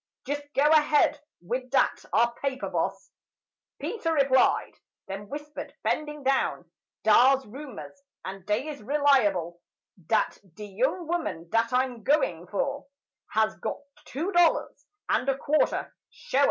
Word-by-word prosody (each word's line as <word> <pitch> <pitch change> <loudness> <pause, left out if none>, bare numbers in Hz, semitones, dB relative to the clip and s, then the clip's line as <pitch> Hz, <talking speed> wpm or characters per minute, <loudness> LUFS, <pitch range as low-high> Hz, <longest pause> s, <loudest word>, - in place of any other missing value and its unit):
"Jis' 290 +2 -2
go 275 - +3
ahead 300 -1 +4 0.2
wid 250 +8 -3
dat - - +1
'ar 235 +1 +3
paper, 270 -2 -2
Boss," - - -2 0.7
Peter 345 -8 -2
replied; 275 -3 +2 0.3
then 200 +1 -7
whispered, 295 +1 -7
bending 300 -1 -2
down: 270 0 0 0.4
"Dar's 260 +5 +5
rumers—and 265 -5 -10
dey 215 +8 0
is 290 -2 -7
reliable— 210 - +2 0.5
Dat 220 - +1 0.2
de 210 - -8
young 260 - -1
woman 315 - -3
dat 230 0 +2
I'm 250 -2 0
goin' 180 - +1
fur 275 +9 -1 0.5
Has 220 0 +2
got - - -3 0.3
two 325 +9 -3
dollars 350 -3 +2 0.2
and 255 - +1
a 270 - +1
quarter—shoa. 285 -2 -1
265 Hz, 125 wpm, -27 LUFS, 220-295 Hz, 0.7 s, Dar's